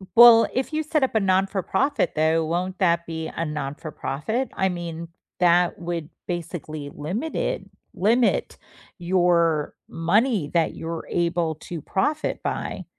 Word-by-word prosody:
W 190 - -13
well, 235 -1 +9
if 260 +4 -1
you 310 +1 0
set 305 -1 0
up 265 - +1
a 220 - +3
non-for-profit, 190 - +1
though, 160 +1 +2
won't 180 +3 -2
that 170 -2 +2
be 160 -1 -5
a 165 - -3
non-for-profit? 150 - -3
I 190 - +1
mean, 170 -1 -5 0.3
that 175 0 +4
would 170 -3 -4 0.2
basically 155 -4 -5
limit 190 - -4
it - - -2 0.3
limit 230 +5 +2 0.4
your 170 -3 +2
money 200 - +1
that 165 -2 +2
you're 165 0 -5
able 170 -2 0
to 165 0 -7
profit 295 - -1
by. - - -3
175 Hz, 140 wpm, -24 LUFS, 165-195 Hz, 0.4 s, well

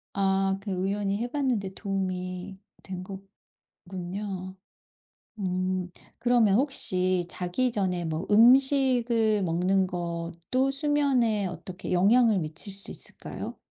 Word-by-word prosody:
아 195 0 +1
그 200 0 -5
우연히 195 +2 -1
해 235 +3 -2
봤는데 245 -9 -1
도움이 185 -1 -4 0.3
된 185 -1 -6 0.6
거군요. 185 +1 -6 0.8
음 185 -1 -1 0.3
그러면 240 -4 +3
혹시 185 -10 +1
자기 185 +9 -1
전에 185 -5 -1
뭐 160 +3 -3
음식을 240 -2 +4
먹는 185 +2 +1
것도 170 +8 -2
수면에 275 -7 +2
어떻게 180 +1 -7
영향을 215 +4 +4
미칠 160 +5 -4
수 195 +1 -5
있을까요? - - -7
195 Hz, 220 characters per minute, -27 LUFS, 180-230 Hz, 0.8 s, 음식을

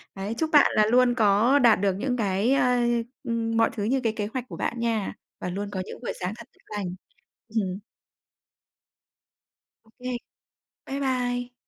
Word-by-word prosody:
Đấy, 195 +3 -3
chúc 320 - 0
bạn 295 - +7
là 215 - +5
luôn 245 +2 +4
có 225 +5 +4
đạt 235 -6 +5
được 200 -2 +2
những 245 +6 -2
cái, 205 +3 +1
ơ, 250 -2 +3 0.4
ưm, 230 -1 -1
mọi 225 0 +4
thứ 205 - -3
như 255 +6 +1
cái 225 -2 +1
kế 210 -2 -2
hoạch 255 -2 -3
của - - -7
bạn 235 - -2
nha, 230 -3 -1 0.3
và - - -2
luôn 200 +3 -4
có 190 - -2
những - - -9
buổi - - -3
sáng 185 +1 -2
thật - - -11
tốt - - -30 0.2
lành. 180 -3 -3 0.5
Ừm. 200 -4 -1 2.0
OK. 245 +3 -6 0.7
Bái 275 +1 -4
bai! 245 -2 -1
230 Hz, 175 wpm, -26 LUFS, 205-250 Hz, 2.0 s, bạn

